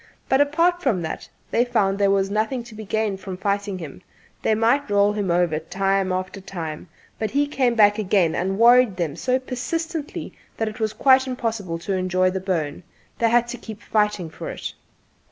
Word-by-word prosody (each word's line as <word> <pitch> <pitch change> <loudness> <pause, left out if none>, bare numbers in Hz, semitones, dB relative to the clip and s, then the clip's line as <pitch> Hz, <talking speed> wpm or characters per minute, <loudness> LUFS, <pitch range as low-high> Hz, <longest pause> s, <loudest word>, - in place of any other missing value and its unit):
But 265 +1 +4
apart 335 +5 +2
from 215 - +1
that, 160 - -5 0.2
they 240 - +3
found 200 -5 +1
there 200 -1 +3
was 195 0 +2
nothing 220 +4 -1
to 235 -1 -13
be 215 0 -8
gained 205 -2 -1
by 190 -2 -5
fighting 200 +1 -1
him: 160 -2 -9 0.4
they 220 - +2
might 235 +5 +2
roll 205 0 +3
him 205 -3 -2
over 170 -3 +2
time 195 +3 0
after 185 +2 -3
time, 170 -3 -6 0.3
but 220 - -1
he 285 +1 +2
came 260 -4 +1
back 205 -1 +5
again 185 -5 +2
and 190 +3 -1
worried 240 -3 +6
them 165 -5 -2
so 255 +8 +1
persistently 295 +5 -4 0.2
that 225 - -1
it 215 +2 -6
was 220 -1 0
quite 265 +1 +4
impossible 225 -8 -3
to 180 +4 -3
enjoy 185 0 +1
the 190 - -2
bone 170 -6 -2 0.4
they 230 - +3
had 240 +1 +3
to 245 - -6
keep 220 -3 -8
on - - -22
fighting 210 -5 +1
for 160 - -7
it. - - -6
205 Hz, 195 wpm, -23 LUFS, 185-240 Hz, 0.4 s, worried